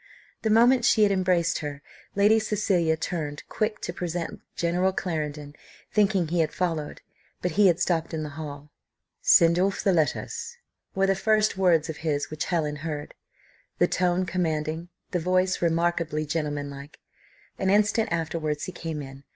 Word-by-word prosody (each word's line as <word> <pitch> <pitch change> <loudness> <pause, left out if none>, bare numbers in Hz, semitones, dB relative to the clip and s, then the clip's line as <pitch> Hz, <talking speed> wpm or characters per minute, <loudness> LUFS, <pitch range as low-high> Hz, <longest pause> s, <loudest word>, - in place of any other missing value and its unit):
The 220 - 0
moment 240 +3 +5
she 220 -2 +4
had 205 - +4
embraced 185 -3 +1
her, 145 -2 -6 0.3
Lady 210 +3 +5
Cecilia 190 -7 +1
turned 155 -3 -4
quick 215 0 -1
to 175 - -4
present 175 -1 -4
General 175 +3 +1
Clarendon, 150 -5 -4 0.4
thinking 200 -5 +3
he 175 +1 0
had 160 - +2
followed, 165 -5 -3 0.4
but 180 - 0
he 205 +4 +5
had 175 -1 +3
stopped 165 -3 0
in 160 -2 -3
the 150 - -5
hall. 145 -1 -8 0.5
"Send 170 +1 +5
off 195 +1 0
the 195 - +3
letters," 465 - -1 0.4
were 195 0 +3
the 195 - +3
first 215 +2 +2
words 175 -5 +3
of 160 -2 -5
his 150 -3 -2
which 155 - -3
Helen 155 -4 -1
heard. 150 -1 -5 0.6
The - - +4
tone 180 +1 +1
commanding, 165 -2 -2 0.2
the 180 - 0
voice 185 +2 +1
remarkably 165 -2 0
gentlemanlike. 145 -2 -4 0.6
An 190 - +1
instant 210 +2 +2
afterwards 160 -2 -2
he - - -4
came 165 -4 -5
in. 135 0 -11
170 Hz, 160 wpm, -26 LUFS, 155-190 Hz, 0.6 s, moment